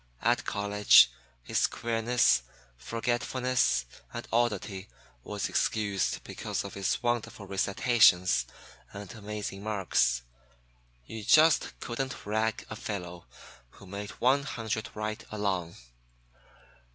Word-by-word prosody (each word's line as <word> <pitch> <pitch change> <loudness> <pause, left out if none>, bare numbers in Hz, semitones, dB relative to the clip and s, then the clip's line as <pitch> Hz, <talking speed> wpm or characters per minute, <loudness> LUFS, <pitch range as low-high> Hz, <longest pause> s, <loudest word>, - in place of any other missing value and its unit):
At - - +2
college 100 -11 +5 0.3
his - - +1
queerness, 115 - +2 0.3
forgetfulness 120 - 0 0.3
and - - -7
oddity 105 -4 -1 0.3
was - - -3
excused 100 -3 0
because - - -4
of - - -8
his 100 +5 -1
wonderful 120 -3 -2
recitations 100 -1 +3 0.5
and 100 +3 -8
amazing 105 -2 -6
marks. 95 - +1 0.8
You 110 - -7
just 155 +8 +4
couldn't 130 +2 -4
rag 110 +1 -1
a 110 - -7
fellow 90 -5 -6 0.5
who - - -15
made 100 +2 -6
one 130 +3 +4
hundred 110 -5 -4
right 110 0 -4
along. 95 -5 -2
105 Hz, 105 wpm, -29 LUFS, 100-120 Hz, 0.8 s, college